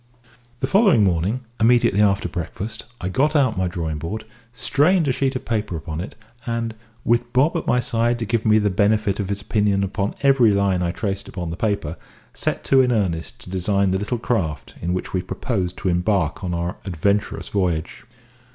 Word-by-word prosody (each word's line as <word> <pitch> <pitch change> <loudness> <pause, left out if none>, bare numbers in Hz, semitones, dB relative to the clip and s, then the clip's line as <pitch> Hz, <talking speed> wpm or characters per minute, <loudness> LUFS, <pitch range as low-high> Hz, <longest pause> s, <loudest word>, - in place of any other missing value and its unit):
The - - +2
following 195 - +5
morning, 95 +6 +1 0.2
immediately 115 -3 +4
after 100 -3 +3
breakfast, 95 +6 -5
I 90 - -3
got 145 - +1
out 130 -6 +3
my 95 0 0
drawing 80 -3 -3
board, 105 +8 -5 0.3
strained 150 +7 +2
a - - +3
sheet 135 +1 0
of 130 - -4
paper 105 -5 -1
upon 80 +1 -5
it, 95 - -7 0.3
and, 115 -1 -2 0.3
with 120 +1 +1
Bob 140 +7 +3
at 170 - -2
my 125 - +3
side 120 0 +1
to 115 - -3
give 115 0 0
me 110 -1 +5
the 105 -2 +2
benefit 105 +1 +2
of 100 -2 -2
his 100 0 -2
opinion 105 -3 +1
upon 100 +1 -2
every 135 -5 +5
line 100 -3 +2
I 85 - 0
traced 100 +2 -3
upon 85 -3 -5
the - - -4
paper, 95 -6 -1 0.4
set - - -2
to 135 -1 +5
in 125 -1 +2
earnest 100 0 -1
to 110 - -8
design 95 +1 +1
the 95 - +1
little 105 +5 -2
craft 95 -10 -2
in 90 +2 -1
which 90 - -4
we 95 - +1
proposed 95 -1 -3
to 95 - -1
embark 90 +3 0
on 90 - -2
our 85 +1 -3
adventurous 100 +3 -1
voyage. 90 -4 -1
100 Hz, 195 wpm, -22 LUFS, 90-120 Hz, 0.4 s, following